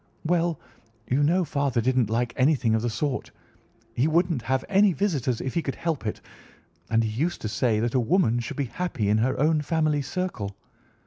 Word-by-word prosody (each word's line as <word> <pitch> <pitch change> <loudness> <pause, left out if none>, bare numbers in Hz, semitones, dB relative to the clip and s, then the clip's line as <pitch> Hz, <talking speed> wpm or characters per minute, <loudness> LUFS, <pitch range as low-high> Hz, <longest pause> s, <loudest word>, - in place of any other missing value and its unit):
"Well, 170 -1 +1 0.5
you 130 +3 +1
know 175 +5 +3
father 140 -4 0
didn't 125 -1 +1
like 115 +2 0
anything 130 -4 +2
of 110 - +2
the 120 - -1
sort. 140 +4 -2 0.6
He 125 +6 +2
wouldn't 165 -3 +1
have 130 +2 -1
any 200 -1 +4
visitors 140 - 0
if 130 - -4
he 170 - +1
could 135 - -4
help 160 -9 -2
it, 105 - -4 0.7
and 115 0 +3
he 110 - -1
used 175 +2 0
to - - -3
say 110 0 +1
that 115 +1 -1
a 130 - +3
woman 120 - +2
should 120 - -5
be 140 - 0
happy 130 - -2
in 105 +1 +3
her 130 +4 0
own 155 +1 +3
family 155 -1 +1
circle. 135 - -4
135 Hz, 195 wpm, -25 LUFS, 120-165 Hz, 0.7 s, any